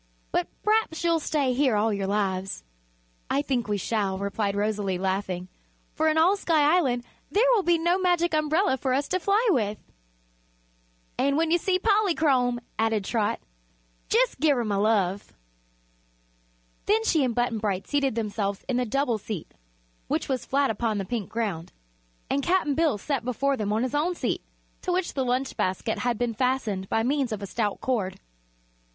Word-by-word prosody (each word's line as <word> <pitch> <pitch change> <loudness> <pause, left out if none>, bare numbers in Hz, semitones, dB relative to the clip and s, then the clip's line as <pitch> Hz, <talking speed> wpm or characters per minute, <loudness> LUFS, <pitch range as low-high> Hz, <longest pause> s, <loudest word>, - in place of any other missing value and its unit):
But 175 - 0 0.2
p'raps 425 -7 +1
you'll 335 -1 +3
stay 290 -4 0
here 260 -3 +2
all 215 +1 +2
your 200 -1 -2
lives." 195 - -1 0.7
"I 280 - +1
think 250 -6 -1
we 205 -1 0
shall," 200 -1 -1
replied 200 +1 -2
Rosalie, 205 -2 -1
laughing, 190 -1 -2 0.5
"for 315 - +1
in 315 0 +2
all 345 +5 +5
Sky 320 -5 +3
Island 250 -9 +1 0.3
there 430 +5 +3
will 445 - +4
be 345 -2 +3
no 345 +3 +1
Magic 350 -2 +2
Umbrella 310 +1 +2
for 260 0 -1
us 285 +1 0
to 370 - +1
fly 405 +6 +2
with." 215 - 0 1.4
"And 280 +1 +2
when 325 0 +1
you 345 - +4
see 370 +2 +1
Polychrome," 320 - +2 0.2
added 220 -3 +1
Trot, 215 -2 0 0.7
"jus' - - +3
give 295 -3 +3
her 240 - 0
my 205 -2 0
love." 200 -2 +1 1.5
Then 435 +2 +3
she 320 -9 +2
and 245 -3 0
Button 240 -2 0
Bright 200 -3 -2
seated 275 -4 +1
themselves 205 -3 -2
in 250 - 0
the 250 - +1
double 245 -1 0
seat, 200 -5 -6 0.5
which - - -1
was 260 -3 -2
flat 275 -2 +2
upon 220 0 -1
the 195 - -2
pink 225 -2 -3
ground, 200 -8 -3 0.6
and 280 - 0
Cap'n 345 -3 +1
Bill 315 -5 +2
sat 275 +4 -2
before 270 +3 0
them 210 -4 -2
on 220 +3 +1
his 255 - -2
own 325 +5 +1
seat, - - -2 0.4
to 365 - -2
which 360 0 -1
the 270 - 0
lunch 255 +2 -1
basket 190 +5 -1
had 245 -2 0
been 240 0 -1
fastened 220 -6 -1
by 225 - +1
means 270 0 0
of 210 -2 -4
a - - -2
stout 205 +1 -2
cord. 215 -8 -1
250 Hz, 175 wpm, -26 LUFS, 210-315 Hz, 1.5 s, all